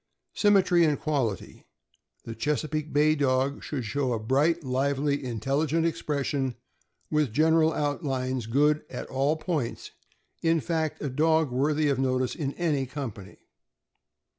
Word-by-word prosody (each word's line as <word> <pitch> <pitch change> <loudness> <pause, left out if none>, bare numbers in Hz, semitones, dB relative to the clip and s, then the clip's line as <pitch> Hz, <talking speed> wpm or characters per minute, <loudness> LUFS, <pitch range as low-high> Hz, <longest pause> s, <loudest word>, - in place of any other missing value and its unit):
Symmetry 195 -4 +4
and 150 -3 +2
quality. 130 - -3 0.3
— - - -42
The 115 - -5
Chesapeake 150 +5 -2
Bay 150 +1 +4
Dog 135 -1 0
should 135 -6 -4
show 130 +3 -1
a 115 - -1
bright, 145 +9 +1
lively, 140 +2 0
intelligent 140 +7 0
expression, 140 -5 -1 0.6
with 150 -5 +1
general 160 +4 +3
outlines 135 -5 -2
good 150 +5 +3
at 125 - -6
all 140 +3 +1
points; 155 -7 -3 0.5
in 165 0 +2
fact, 160 -1 -2
a 145 - -1
dog 160 +1 +2
worthy 150 +4 +1
of 140 -2 +1
notice 130 -1 0
in 140 -4 -3
any 150 -6 -1
company. 120 -8 -7
145 Hz, 135 wpm, -27 LUFS, 130-155 Hz, 0.6 s, Symmetry